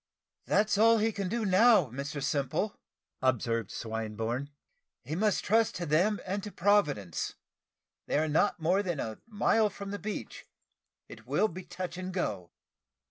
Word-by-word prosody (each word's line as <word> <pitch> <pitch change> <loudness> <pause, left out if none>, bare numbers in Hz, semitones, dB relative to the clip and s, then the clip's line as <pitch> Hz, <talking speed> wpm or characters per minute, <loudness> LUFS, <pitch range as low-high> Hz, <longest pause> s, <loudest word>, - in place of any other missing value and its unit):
"That's 205 -1 +2
all 230 +1 +6
he 220 +1 +2
can 200 -3 -3
do 230 +1 -1
now, 190 - +5
Mr 140 +2 -4
Simple," 140 +8 -1 0.5
observed 115 -4 0
Swinburne; 115 +4 -3 0.5
"he 155 - -4
must 210 +2 +1
trust 225 +2 +3
to 175 - -3
them 180 +8 +2
and 195 +2 -2
to 210 - -7
Providence. 150 - +1 0.7
They - - +1
are 155 +1 +2
not 160 +6 +2
more 180 +5 +2
than 175 -7 -3
a 110 -3 -4
mile 220 0 +2
from 200 -1 -7
the 205 - -4
beach 215 0 -6 0.6
it - - -13
will 215 - +2
be 185 -1 -8
touch 180 -1 -6
and 185 0 -4
go." 100 - -3
180 Hz, 155 wpm, -30 LUFS, 140-205 Hz, 0.7 s, all